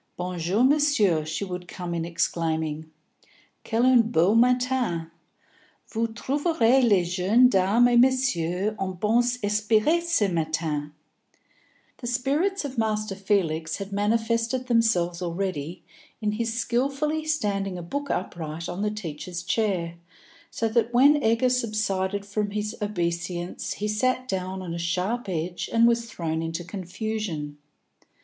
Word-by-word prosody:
"Bon 180 Hz, 0 st, -4 dB
jour, 185 Hz, +8 st, +1 dB
Monsieur," 260 Hz, -, +3 dB
she 155 Hz, +6 st, -3 dB
would 180 Hz, -1 st, -6 dB
come 180 Hz, -1 st, -5 dB
in 165 Hz, -1 st, -2 dB
exclaiming. 160 Hz, -2 st, -2 dB, 0.7 s
"Quel 230 Hz, +2 st, +1 dB
un 255 Hz, -2 st, +6 dB
beau 175 Hz, +1 st, +3 dB
matin! 245 Hz, -8 st, +2 dB, 0.8 s
Vous 230 Hz, 0 st, -1 dB
trouverez 265 Hz, +1 st, +2 dB
les 200 Hz, -6 st, +4 dB
jeunes 195 Hz, +8 st, +4 dB
dames 200 Hz, +5 st, +4 dB
et 245 Hz, 0 st, +3 dB
messieurs 215 Hz, -7 st, +2 dB
en 190 Hz, -1 st, -2 dB
bons 240 Hz, +4 st, +2 dB
esprits 215 Hz, +10 st, +2 dB
ce 340 Hz, -12 st, +1 dB
matin." 155 Hz, -2 st, -2 dB, 1.1 s
The 240 Hz, -, -7 dB
spirits 290 Hz, +10 st, 0 dB
of 260 Hz, -4 st, -4 dB
Master 215 Hz, -2 st, -1 dB
Felix 170 Hz, -5 st, 0 dB
had 200 Hz, 0 st, -7 dB
manifested 230 Hz, +4 st, 0 dB
themselves 220 Hz, -8 st, +1 dB
already 175 Hz, -2 st, -3 dB, 0.4 s
in 210 Hz, -1 st, 0 dB
his 225 Hz, +2 st, -2 dB
skilfully 275 Hz, +7 st, -1 dB
standing 200 Hz, -11 st, -1 dB
a 175 Hz, -, -6 dB
book 285 Hz, +11 st, -4 dB
upright 165 Hz, -2 st, -4 dB
on 175 Hz, +2 st, -4 dB
the 210 Hz, -, +1 dB
teacher's 175 Hz, -3 st, -6 dB
chair, 175 Hz, -3 st, -1 dB, 0.5 s
so 230 Hz, -, -1 dB
that 230 Hz, +1 st, +1 dB
when 285 Hz, +5 st, +5 dB
Egger 230 Hz, +1 st, +3 dB
subsided 205 Hz, -5 st, -1 dB
from 205 Hz, +1 st, -2 dB
his 210 Hz, +2 st, -3 dB
obeisance 175 Hz, -3 st, -3 dB
he 210 Hz, -, -3 dB
sat 255 Hz, +4 st, 0 dB
down 190 Hz, -2 st, -3 dB
on 170 Hz, -2 st, -5 dB
a 170 Hz, -, -4 dB
sharp 185 Hz, +7 st, -1 dB
edge 175 Hz, 0 st, -3 dB
and 230 Hz, 0 st, +5 dB
was 235 Hz, -1 st, +1 dB
thrown 160 Hz, -4 st, -3 dB
into 165 Hz, +1 st, -4 dB
confusion. 185 Hz, -5 st, -5 dB
205 Hz, 135 wpm, -25 LUFS, 175-235 Hz, 1.1 s, un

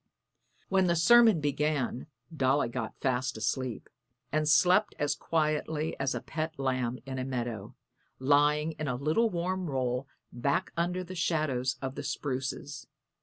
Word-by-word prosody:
When 190 Hz, -1 st, +3 dB
the 170 Hz, -, +3 dB
sermon 220 Hz, +3 st, +6 dB
began 145 Hz, -3 st, -1 dB, 0.3 s
Dolly 135 Hz, -2 st, +2 dB
got 120 Hz, -2 st, -5 dB
fast 130 Hz, -1 st, 0 dB
asleep, 120 Hz, +3 st, -2 dB, 0.4 s
and 155 Hz, 0 st, +1 dB
slept 180 Hz, +7 st, +4 dB
as 145 Hz, -1 st, +1 dB
quietly 155 Hz, 0 st, -1 dB
as 140 Hz, -1 st, 0 dB
a -, -, -3 dB
pet 160 Hz, 0 st, -4 dB
lamb 130 Hz, -2 st, -1 dB
in 130 Hz, -1 st, -4 dB
a -, -, -1 dB
meadow, 120 Hz, -5 st, -4 dB, 0.4 s
lying 150 Hz, +3 st, +3 dB
in 155 Hz, -, -2 dB
a 125 Hz, -, -1 dB
little 155 Hz, -, +2 dB
warm 180 Hz, 0 st, -2 dB
roll 130 Hz, -1 st, -1 dB, 0.3 s
back 130 Hz, +3 st, 0 dB
under 175 Hz, +2 st, -1 dB
the 185 Hz, +1 st, -8 dB
shadows 150 Hz, -7 st, 0 dB
of 130 Hz, -1 st, -3 dB
the -, -, -5 dB
spruces. 140 Hz, +1 st, -4 dB
145 Hz, 145 wpm, -30 LUFS, 130-160 Hz, 0.4 s, sermon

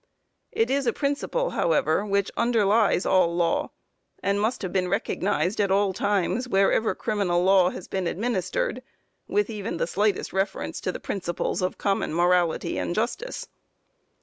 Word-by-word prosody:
It 230 Hz, +3 st, 0 dB
is 275 Hz, -1 st, +1 dB
a 235 Hz, -, +2 dB
principle, 305 Hz, -, -1 dB
however, 160 Hz, +2 st, +1 dB
which 200 Hz, -1 st, 0 dB
underlies 220 Hz, -4 st, +2 dB
all 175 Hz, -3 st, +3 dB
law, 170 Hz, -1 st, +1 dB, 0.5 s
and 200 Hz, +1 st, +1 dB
must 220 Hz, +1 st, -1 dB
have 185 Hz, -, -4 dB
been 185 Hz, -2 st, +1 dB
recognized 200 Hz, 0 st, 0 dB
at 200 Hz, -, +1 dB
all 195 Hz, 0 st, +2 dB
times, 205 Hz, +4 st, 0 dB
wherever 195 Hz, +1 st, +2 dB
criminal 185 Hz, -5 st, 0 dB
law 190 Hz, -1 st, +5 dB
has 185 Hz, -, -8 dB
been 190 Hz, -2 st, -2 dB
administered, 235 Hz, -, -2 dB, 0.5 s
with 415 Hz, 0 st, +1 dB
even 210 Hz, -4 st, -4 dB
the -, -, 0 dB
slightest 200 Hz, +3 st, 0 dB
reference 195 Hz, 0 st, -2 dB
to 185 Hz, -, -1 dB
the -, -, -7 dB
principles 175 Hz, -2 st, -3 dB
of 185 Hz, -, -1 dB
common 195 Hz, -5 st, -1 dB
morality 175 Hz, -1 st, +2 dB
and 175 Hz, -, -2 dB
justice. 250 Hz, -, -3 dB
195 Hz, 150 wpm, -25 LUFS, 180-220 Hz, 0.5 s, law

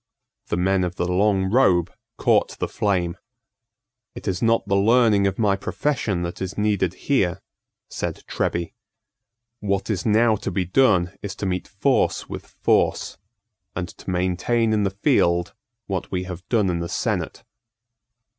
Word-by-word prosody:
The -, -, -1 dB
men 95 Hz, +1 st, +2 dB
of 90 Hz, 0 st, -3 dB
the 90 Hz, -, -1 dB
long 95 Hz, +1 st, +2 dB
robe 95 Hz, -9 st, +3 dB, 0.2 s
caught -, -, +2 dB
the -, -, -2 dB
flame. 90 Hz, -4 st, -1 dB, 1.0 s
"It -, -, -8 dB
is 90 Hz, -2 st, -1 dB
not 115 Hz, -1 st, +2 dB
the 100 Hz, -, +2 dB
learning 105 Hz, -1 st, +4 dB
of 95 Hz, -, -2 dB
my 105 Hz, -3 st, +2 dB
profession 100 Hz, -4 st, -1 dB
that 85 Hz, +1 st, -5 dB
is 95 Hz, +1 st, -4 dB
needed 100 Hz, -4 st, +1 dB
here," 95 Hz, -10 st, +1 dB, 0.5 s
said -, -, -5 dB
Treby. 85 Hz, -1 st, -2 dB, 0.9 s
"What 100 Hz, +1 st, -1 dB
is 95 Hz, -, -2 dB
now 110 Hz, 0 st, +3 dB
to 100 Hz, -, -4 dB
be 95 Hz, 0 st, -1 dB
done 95 Hz, -4 st, +3 dB
is 100 Hz, -1 st, -5 dB
to 100 Hz, -, -5 dB
meet 90 Hz, -1 st, -2 dB
force 120 Hz, +5 st, +1 dB
with -, -, -7 dB
force, -, -, 0 dB, 0.6 s
and 90 Hz, 0 st, -3 dB
to -, -, -10 dB
maintain 95 Hz, +6 st, +1 dB
in 105 Hz, -, +2 dB
the 100 Hz, -, +2 dB
field 90 Hz, -, +1 dB, 0.3 s
what 95 Hz, -2 st, -3 dB
we 90 Hz, -1 st, -2 dB
have 90 Hz, 0 st, -8 dB
done 105 Hz, -6 st, +2 dB
in 85 Hz, -, -2 dB
the 85 Hz, 0 st, -4 dB
senate." -, -, -2 dB
95 Hz, 155 wpm, -23 LUFS, 90-105 Hz, 1.0 s, learning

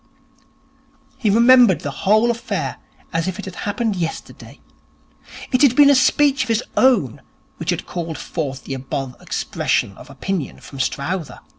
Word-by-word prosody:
He 225 Hz, -5 st, +1 dB
remembered 235 Hz, -2 st, +6 dB
the 145 Hz, -, -4 dB
whole 215 Hz, +10 st, +2 dB
affair 235 Hz, 0 st, -4 dB, 0.4 s
as 165 Hz, +2 st, -1 dB
if 185 Hz, -, -3 dB
it 205 Hz, -, -7 dB
had 190 Hz, -, -7 dB
happened 210 Hz, +3 st, -2 dB
yesterday. 165 Hz, -3 st, -6 dB, 0.9 s
It 255 Hz, -, +2 dB
had 270 Hz, -4 st, +5 dB
been 285 Hz, 0 st, +7 dB
a -, -, +5 dB
speech 275 Hz, +1 st, +3 dB
of 255 Hz, -, -1 dB
his 225 Hz, +1 st, +1 dB
own 220 Hz, -, +2 dB, 0.4 s
which -, -, -5 dB
had -, -, -1 dB
called 165 Hz, -3 st, -5 dB
forth 140 Hz, -5 st, -5 dB
the -, -, -6 dB
above 135 Hz, -1 st, -5 dB
expression 100 Hz, -, -1 dB
of -, -, -13 dB
opinion 155 Hz, +4 st, -4 dB
from 135 Hz, -, -11 dB
Strowther. 150 Hz, +6 st, -3 dB
195 Hz, 155 wpm, -20 LUFS, 145-240 Hz, 0.9 s, been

